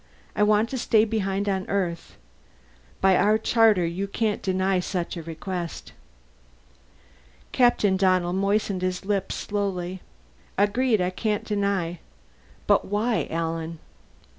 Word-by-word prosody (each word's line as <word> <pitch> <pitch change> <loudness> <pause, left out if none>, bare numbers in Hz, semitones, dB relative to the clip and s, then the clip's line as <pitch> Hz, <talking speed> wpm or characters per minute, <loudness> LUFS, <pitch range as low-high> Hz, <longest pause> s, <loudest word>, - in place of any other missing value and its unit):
I - - -1
want 210 +1 +4
to 260 - -3
stay 220 -1 +3
behind 200 -2 -1
on 190 -1 -1
Earth. 175 -4 -2 0.8
By 190 -1 +5
our 210 +4 +4
charter 220 -4 +3
you 180 +4 -3
can't 210 +1 -1
deny 190 0 +1
such 180 -1 -3
a 170 - -5
request." 170 +2 -6 1.6
Captain 240 -6 +3
Donnell 185 -2 +2
moistened 195 0 0
his 185 +1 -2
lips 195 -1 -1
slowly. 190 -3 -3 0.6
"Agreed, 215 +2 +2
I 180 0 0
can't 210 +2 -1
deny. 200 -5 -1 0.7
But - - +3
why, 215 +3 0
Alan?" 165 0 -3
195 Hz, 120 wpm, -25 LUFS, 180-210 Hz, 1.6 s, By